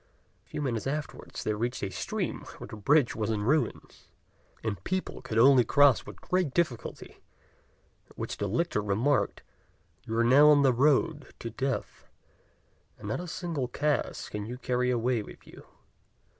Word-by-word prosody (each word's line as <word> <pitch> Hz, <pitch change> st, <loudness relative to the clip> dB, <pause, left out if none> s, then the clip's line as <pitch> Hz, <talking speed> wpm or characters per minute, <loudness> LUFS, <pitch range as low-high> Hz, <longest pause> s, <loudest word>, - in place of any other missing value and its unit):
A -, -, -30 dB
few 150 Hz, -, -4 dB
minutes 120 Hz, -3 st, -2 dB
afterwards 150 Hz, +1 st, -5 dB
they 110 Hz, -, 0 dB
reached 120 Hz, +3 st, -3 dB
a 95 Hz, -, -2 dB
stream -, -, -3 dB, 0.2 s
where -, -, -8 dB
the -, -, -8 dB
bridge 135 Hz, +5 st, +3 dB
was 110 Hz, -1 st, -2 dB
in 105 Hz, -2 st, -1 dB
ruins, 150 Hz, +7 st, -1 dB, 0.6 s
and 100 Hz, -5 st, -3 dB
people 185 Hz, 0 st, -3 dB
could 110 Hz, -, -4 dB
only 130 Hz, +1 st, +7 dB
cross 140 Hz, +2 st, +4 dB
with -, -, -10 dB
great 180 Hz, -7 st, 0 dB
difficulty; 155 Hz, -10 st, -2 dB, 0.9 s
at -, -, -21 dB
which -, -, -4 dB
the 100 Hz, -, -2 dB
lictor 115 Hz, -, 0 dB
remarked, 110 Hz, +4 st, 0 dB, 0.6 s
"You 115 Hz, -, -2 dB
are 115 Hz, -, +4 dB
now 140 Hz, +5 st, +7 dB
on 145 Hz, -1 st, +6 dB
the 130 Hz, -2 st, +4 dB
road 145 Hz, +3 st, +1 dB
to 115 Hz, -, -6 dB
death, 135 Hz, +3 st, -4 dB, 0.9 s
and 100 Hz, -, -7 dB
not 110 Hz, -, -1 dB
a 180 Hz, -, -6 dB
single 165 Hz, -6 st, -3 dB
cash 150 Hz, +4 st, -1 dB
can 105 Hz, 0 st, -5 dB
you 125 Hz, +2 st, -6 dB
carry 125 Hz, -1 st, 0 dB
away 120 Hz, -1 st, +1 dB
with -, -, -12 dB
you. -, -, -14 dB
125 Hz, 170 wpm, -29 LUFS, 110-145 Hz, 0.9 s, only